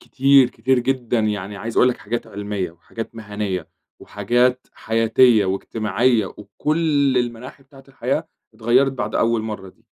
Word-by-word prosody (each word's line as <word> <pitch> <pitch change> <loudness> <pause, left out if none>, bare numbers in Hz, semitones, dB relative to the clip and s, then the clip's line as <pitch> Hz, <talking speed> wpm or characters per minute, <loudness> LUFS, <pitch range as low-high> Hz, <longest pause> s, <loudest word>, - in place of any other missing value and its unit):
كتير 135 -1 +4
كتير 130 +3 +1
جدًا 125 -1 -1
يعني 105 -2 -2
عايز 115 +3 -6
أقول 125 - +5
لك 125 - -1
حاجات 115 +3 -4
علمية 100 -3 -4
وحاجات 110 +7 -9
مهنية 105 -5 -4 0.3
وحاجات 125 +1 0
حياتية 115 0 +3
وإجتماعية 110 +3 0
وكل 140 - 0
المناحي 120 +3 -5
بتاعة 135 0 -18
الحياة، 135 +4 -2 0.3
اتغيّرت 120 +5 +2
بعد 110 -5 -4
أول 115 -1 +1
مَرّة 105 -3 -6
دي، - - -22
115 Hz, 140 wpm, -21 LUFS, 105-130 Hz, 0.3 s, أقول